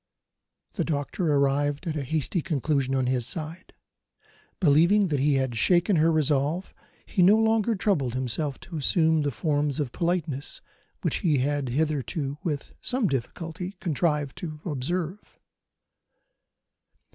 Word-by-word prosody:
The -, -, -1 dB
doctor 155 Hz, +2 st, -1 dB
arrived 145 Hz, +2 st, +1 dB
at 160 Hz, -2 st, -2 dB
a 150 Hz, -, -1 dB
hasty 155 Hz, +5 st, -1 dB
conclusion, 140 Hz, -3 st, 0 dB
on 130 Hz, -1 st, +1 dB
his 125 Hz, -2 st, 0 dB
side. 165 Hz, +3 st, -5 dB, 0.9 s
Believing 175 Hz, +5 st, +4 dB
that 145 Hz, -3 st, 0 dB
he 145 Hz, +1 st, +3 dB
had 130 Hz, -3 st, 0 dB
shaken 175 Hz, -, +3 dB
her 160 Hz, +2 st, +4 dB
resolution, 155 Hz, +3 st, 0 dB, 0.3 s
he 185 Hz, -, 0 dB
no 195 Hz, +5 st, +7 dB
longer 225 Hz, 0 st, +2 dB
troubled 150 Hz, -, 0 dB
himself 130 Hz, +3 st, -2 dB
to 170 Hz, -, -7 dB
assume 160 Hz, +2 st, +3 dB
the 145 Hz, -, 0 dB
forms 145 Hz, +1 st, 0 dB
of 140 Hz, -5 st, -2 dB
politeness 165 Hz, -5 st, -2 dB, 0.4 s
which -, -, +1 dB
he 160 Hz, -8 st, +2 dB
had 140 Hz, 0 st, 0 dB
hitherto, 145 Hz, +1 st, -1 dB
with 150 Hz, -4 st, -3 dB
some 255 Hz, -2 st, 0 dB
difficulty, 165 Hz, -, -4 dB
contrived 150 Hz, -4 st, 0 dB
to 155 Hz, -3 st, -6 dB
observe. 170 Hz, +5 st, -3 dB
150 Hz, 135 wpm, -26 LUFS, 140-175 Hz, 0.9 s, no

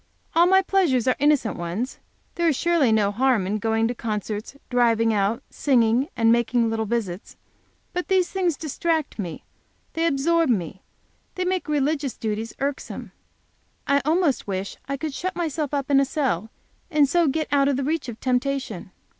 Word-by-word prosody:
All 340 Hz, +1 st, +5 dB
my 380 Hz, +1 st, +5 dB
pleasures 330 Hz, -, +2 dB
are 255 Hz, -, +3 dB
innocent 285 Hz, -8 st, +2 dB
ones; 180 Hz, +10 st, -4 dB, 0.3 s
there 340 Hz, -1 st, 0 dB
is 315 Hz, -, +3 dB
surely 330 Hz, -6 st, +2 dB
no 210 Hz, -2 st, +3 dB
harm 240 Hz, -2 st, +2 dB
in 210 Hz, +3 st, -1 dB
going 225 Hz, +1 st, +1 dB
to 240 Hz, -, -2 dB
concerts, 215 Hz, 0 st, -4 dB, 0.2 s
driving 230 Hz, -2 st, +3 dB
out, 210 Hz, +5 st, 0 dB
singing, 245 Hz, -1 st, +2 dB
and 230 Hz, 0 st, +4 dB
making 235 Hz, 0 st, +2 dB
little 220 Hz, -1 st, -1 dB
visits! 200 Hz, -5 st, -3 dB, 0.6 s
But 360 Hz, 0 st, -2 dB
these 375 Hz, -2 st, +3 dB
things 360 Hz, -6 st, 0 dB
distract 315 Hz, -2 st, -2 dB
me; 175 Hz, -6 st, -5 dB, 0.5 s
they 330 Hz, +1 st, +1 dB
absorb 330 Hz, +2 st, +2 dB
me; 190 Hz, -4 st, -1 dB, 0.5 s
they 365 Hz, -, -2 dB
make 365 Hz, -3 st, -1 dB
religious 290 Hz, -2 st, 0 dB
duties 220 Hz, +1 st, -3 dB
irksome. 280 Hz, 0 st, -4 dB, 0.7 s
I 280 Hz, 0 st, +3 dB
almost 315 Hz, -, +1 dB
wish 195 Hz, 0 st, -3 dB
I 275 Hz, -, -1 dB
could 305 Hz, 0 st, -4 dB
shut 370 Hz, +6 st, -3 dB
myself 315 Hz, -4 st, -2 dB
up 280 Hz, -1 st, -2 dB
in 275 Hz, -, +6 dB
a 275 Hz, -, +3 dB
cell, 255 Hz, -, -1 dB, 0.4 s
and 300 Hz, -4 st, +4 dB
so 340 Hz, +3 st, +2 dB
get 310 Hz, +3 st, 0 dB
out 280 Hz, -1 st, +3 dB
of 280 Hz, -, +2 dB
the 275 Hz, -, -1 dB
reach 305 Hz, -2 st, -1 dB
of 230 Hz, -, -8 dB
temptation. 255 Hz, -6 st, -1 dB
270 Hz, 170 wpm, -24 LUFS, 225-310 Hz, 0.7 s, in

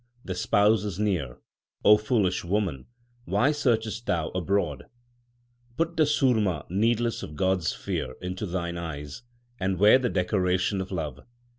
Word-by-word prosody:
The 95 Hz, -, -3 dB
Spouse 105 Hz, +4 st, +3 dB
is 100 Hz, -4 st, -4 dB
near; 90 Hz, -12 st, -1 dB, 0.5 s
O 105 Hz, -, +9 dB
foolish 105 Hz, -4 st, 0 dB
woman, 90 Hz, -7 st, -2 dB, 0.4 s
why 140 Hz, +4 st, +2 dB
searchest 115 Hz, -6 st, -1 dB
thou 80 Hz, -2 st, 0 dB
abroad? 95 Hz, +3 st, -1 dB, 0.9 s
Put 165 Hz, +1 st, 0 dB
the 160 Hz, -2 st, +4 dB
surma 110 Hz, -, +2 dB
5 -, -, -18 dB
needles 115 Hz, +4 st, +1 dB
of 75 Hz, -, -8 dB
God 95 Hz, +4 st, +1 dB
s 80 Hz, -, -1 dB
fear 65 Hz, 0 st, -4 dB
into 90 Hz, +3 st, -4 dB
thine 85 Hz, -1 st, -3 dB
eyes, 75 Hz, -, -6 dB, 0.4 s
and 95 Hz, -1 st, 0 dB
wear 105 Hz, +7 st, +6 dB
the 125 Hz, -2 st, 0 dB
decoration 90 Hz, 0 st, 0 dB
of 95 Hz, -, -6 dB
love. 75 Hz, -8 st, -4 dB
95 Hz, 150 wpm, -26 LUFS, 85-110 Hz, 0.9 s, O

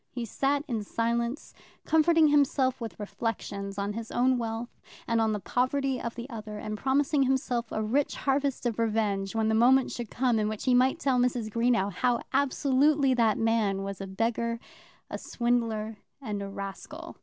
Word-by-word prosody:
He 240 Hz, -2 st, -5 dB
sat 275 Hz, +6 st, 0 dB
in 225 Hz, -4 st, -2 dB
silence, 235 Hz, +5 st, -2 dB, 0.3 s
comforting 320 Hz, 0 st, +4 dB
himself 270 Hz, -3 st, +2 dB
with 225 Hz, -2 st, -6 dB
reflections 200 Hz, -1 st, -4 dB
on 200 Hz, +1 st, -2 dB
his 225 Hz, +1 st, -6 dB
own 255 Hz, +1 st, +2 dB
wealth, 230 Hz, +1 st, -5 dB, 0.3 s
and 230 Hz, -1 st, +2 dB
on 220 Hz, -1 st, +2 dB
the 210 Hz, -, -1 dB
poverty 255 Hz, +5 st, 0 dB
of 235 Hz, -, -4 dB
the 240 Hz, +1 st, -6 dB
other, 215 Hz, -4 st, -7 dB
and 215 Hz, 0 st, -4 dB
promising 275 Hz, +4 st, +1 dB
himself 255 Hz, -3 st, 0 dB
a 215 Hz, -, -1 dB
rich 265 Hz, +7 st, 0 dB
harvest 275 Hz, -1 st, 0 dB
of 235 Hz, -2 st, -1 dB
revenge 210 Hz, -3 st, 0 dB
when 220 Hz, -1 st, +1 dB
the 220 Hz, -, +2 dB
moment 250 Hz, +4 st, +4 dB
should 240 Hz, -3 st, -5 dB
come 245 Hz, -3 st, +1 dB
in 210 Hz, 0 st, 0 dB
which 215 Hz, -1 st, -5 dB
he 255 Hz, -, +3 dB
might 255 Hz, +4 st, +4 dB
tell 270 Hz, -5 st, +1 dB
Mrs. 245 Hz, -3 st, 0 dB
Greenow 230 Hz, -3 st, +2 dB
how 240 Hz, +5 st, +1 dB
absolutely 280 Hz, +1 st, +3 dB
that 230 Hz, -3 st, +2 dB
man 220 Hz, -4 st, +1 dB
was 195 Hz, -1 st, -5 dB
a 195 Hz, -, -5 dB
beggar, 230 Hz, +3 st, -1 dB, 0.5 s
a -, -, -5 dB
swindler, 230 Hz, -3 st, -1 dB, 0.2 s
and 210 Hz, -7 st, -4 dB
a 200 Hz, -, -5 dB
rascal. 195 Hz, -1 st, -7 dB
235 Hz, 180 wpm, -28 LUFS, 215-260 Hz, 0.5 s, comforting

